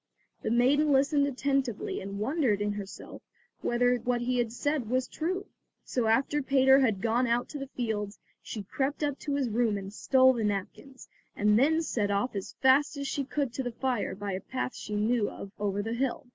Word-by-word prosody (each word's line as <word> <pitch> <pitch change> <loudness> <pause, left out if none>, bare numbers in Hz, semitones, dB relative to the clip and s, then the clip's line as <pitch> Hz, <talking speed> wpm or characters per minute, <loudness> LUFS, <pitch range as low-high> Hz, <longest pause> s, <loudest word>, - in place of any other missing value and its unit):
The - - -2
maiden 270 +6 +3
listened 280 +1 +3
attentively 275 -3 -1
and 200 +1 -6
wondered 240 -1 +1
in 205 0 0
herself 205 -1 -8 0.4
whether 245 +1 +2
what 240 +1 -1
he 245 0 +1
said 255 0 -2
was 255 +1 +1
true. 370 +5 -3 0.4
So 245 -3 -1
after 270 +6 +2
Peter 265 0 +5
had 220 -8 +1
gone 235 +2 +2
out 235 +1 +1
to 295 - -6
the 275 - -5
fields, 220 -6 -3 0.2
she 215 - -6
crept 275 +9 -2
up 290 -2 -1
to 285 -2 -2
his 275 -3 0
room 225 -2 +1
and 195 0 -7
stole 260 +3 +4
the 235 -3 -2
napkins 210 +6 -4 0.3
and 210 +1 +3
then 320 +5 +3
set 215 -9 -1
off 200 +4 0
as 195 - -5
fast 275 +3 +4
as 280 0 -3
she 280 - -1
could 275 -2 -2
to 265 - -2
the 245 -2 -4
fire 250 -5 -1
by 200 0 -4
a 185 0 -3
path 255 -1 -3
she 210 - -5
knew 215 +1 +1
of 195 - -9
over 205 0 -1
the 225 +2 -3
hill. 260 +2 -2
245 Hz, 200 wpm, -29 LUFS, 210-275 Hz, 0.4 s, Peter